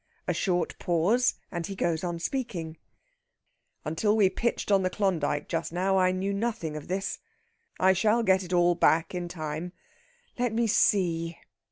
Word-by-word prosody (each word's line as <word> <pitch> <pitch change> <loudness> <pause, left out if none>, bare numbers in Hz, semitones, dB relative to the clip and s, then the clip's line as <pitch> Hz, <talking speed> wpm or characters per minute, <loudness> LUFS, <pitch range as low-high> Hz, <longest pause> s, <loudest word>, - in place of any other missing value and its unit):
A - - +1
short 180 -3 -1
pause, 185 +9 +2 0.2
and 170 -2 -3
he 195 - -6
goes 170 -3 -1
on 175 -1 -2
speaking: 165 -6 -4 1.1
"Until 205 +8 +1
we 195 -3 +4
pitched 235 +1 -1
on 195 -1 +5
the 185 - +1
Klondyke 170 -7 -1
just 165 -1 -2
now 190 +2 +1
I 185 0 +3
knew 190 +2 -2
nothing 200 -7 -2
of 150 - -7
this. 195 +2 -3 0.6
I 190 +1 +5
shall 220 +5 +2
get 190 -3 +3
it 180 - -9
all 175 -1 +4
back 165 0 +2
in 180 -1 -3
time. 160 +1 -5 0.7
Let 245 -2 0
me 230 +1 +1
see!..." 170 -6 +2
185 Hz, 165 wpm, -28 LUFS, 165-200 Hz, 1.1 s, on